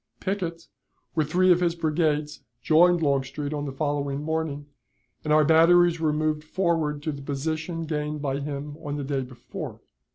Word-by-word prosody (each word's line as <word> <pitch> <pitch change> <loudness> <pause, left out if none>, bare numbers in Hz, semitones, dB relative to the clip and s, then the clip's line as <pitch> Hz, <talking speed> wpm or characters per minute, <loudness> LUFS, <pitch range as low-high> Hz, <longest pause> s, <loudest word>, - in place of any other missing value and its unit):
Pickett, 175 -4 -3 0.5
with 155 -3 0
three 185 +3 +4
of 175 - +5
his 170 -1 +1
brigades, 155 -2 0 0.2
joined 165 +5 +4
Longstreet 140 +1 -1
on 145 -1 -3
the 140 - -4
following 145 0 -2
morning, 160 -2 -2 0.6
and 150 - -2
our 155 0 +5
batteries 170 +2 +5
were 160 -2 +2
moved 155 0 0
forward 155 -4 -1
to 155 - -1
the 140 -1 -7
position 155 +4 -3
gained 150 -1 -3
by 140 -1 -2
him 145 0 -5
on 145 -2 -5
the 145 - -3
day 135 0 -1
before. 125 -1 -8
150 Hz, 165 wpm, -26 LUFS, 145-165 Hz, 0.6 s, of